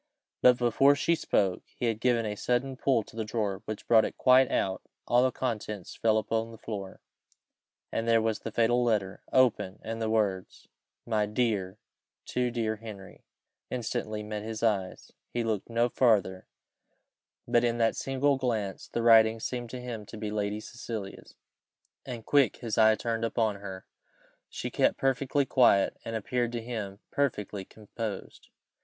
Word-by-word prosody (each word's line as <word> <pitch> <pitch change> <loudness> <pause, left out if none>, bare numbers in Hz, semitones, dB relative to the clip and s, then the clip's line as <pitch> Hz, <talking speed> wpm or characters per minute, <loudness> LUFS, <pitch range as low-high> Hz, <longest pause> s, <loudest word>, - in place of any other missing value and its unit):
But 125 -1 +6
before 125 +4 +4
she 160 +3 +1
spoke, 100 - +1 0.2
he - - -2
had 115 -2 0
given 120 -1 +2
a 105 - -2
sudden 125 +5 -1
pull 130 -3 +1
to - - -16
the 115 - -2
drawer, 105 -3 -2
which 110 - -6
brought 115 -2 +6
it - - -4
quite 130 0 +5
out, 95 -1 0
and - - -36 0.2
all 120 +1 +4
the 130 0 +3
contents 105 -7 -4
fell 110 -1 +2
upon 115 +1 -1
the 115 - -11
floor, 100 -4 -7 0.9
and 115 - -2
there 115 0 +5
was 110 -1 0
the - - -6
fatal 120 +1 +2
letter, 105 -5 0
open, 120 -7 +2
and 115 0 -5
the 110 - 0
words 100 -4 -1 0.4
"My 105 -2 +1
dear, 105 -4 -1 0.5
too 125 -1 0
dear 115 -2 -2
Henry" 105 -3 -11 0.4
instantly 110 -3 -3
met 105 0 -5
his 110 +1 -5
eyes; 100 -5 -1 0.2
he 120 - -2
looked 110 -2 -2
no 115 +1 +2
farther, 105 -7 +2 1.0
but 120 - +3
in 120 -1 +1
that 115 -1 +2
single 135 +1 +1
glance 110 -7 -2
the 115 - -3
writing 115 -1 +6
seemed 120 +1 -4
to 125 - -6
him 115 -4 -6
to - - -9
be 105 -1 -4
Lady 105 0 -2
Cecilia's, 110 -4 -7 0.7
and 120 -3 -6
quick 140 -3 +3
his 115 -3 -3
eye 110 0 +6
turned 115 0 -2
upon 110 -2 0
her. 95 -2 -8 0.6
She - - -5
kept - - +2
perfectly 135 +1 +1
quiet, 120 -8 +4
and 115 - -5
appeared 120 +2 -1
to 115 -1 -3
him 105 -4 -5
perfectly 105 -8 -1
composed. 110 0 -7
115 Hz, 165 wpm, -29 LUFS, 105-120 Hz, 1.0 s, But